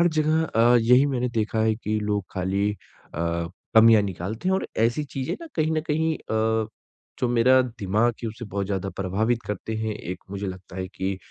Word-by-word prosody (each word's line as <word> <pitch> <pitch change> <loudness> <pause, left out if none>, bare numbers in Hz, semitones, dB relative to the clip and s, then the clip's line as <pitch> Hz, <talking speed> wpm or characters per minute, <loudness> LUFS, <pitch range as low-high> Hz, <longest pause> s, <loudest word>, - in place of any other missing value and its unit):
हर 175 - +5
जगह 155 0 +2
अ, 120 -3 +4
यही 125 +4 +5
मैंने 125 -3 0
देखा 110 -1 -1
है 110 0 +3
कि 110 -1 -2
लोग 105 -2 -1
खाली 95 +2 0
अ, 105 - -11 1.0
कमियाँ 110 -1 +8
निकालते 100 - -4
हैं 190 - +3
और - - -3
ऐसी 120 +7 +2
चीज़ें 135 -1 -4
ना - - -7
कहीं 155 0 +1
न 155 - +1
कहीं 160 +1 +1
अ, 110 0 0 0.5
जो 125 - +2
मेरा 125 +2 +5 0.2
दिमाग 105 +5 +2
है 115 - -1
उसे 115 +2 -8
बहुत 100 0 -3
ज़्यादा 95 -1 -2
प्रभावित 110 +5 0
करते 105 +2 -4
हैं, 110 -1 -2
एक 90 -3 -6
मुझे 100 0 -4
लगता 95 -1 -8
है 95 0 -3
कि 95 0 -3
110 Hz, 195 wpm, -25 LUFS, 100-125 Hz, 1.0 s, कमियाँ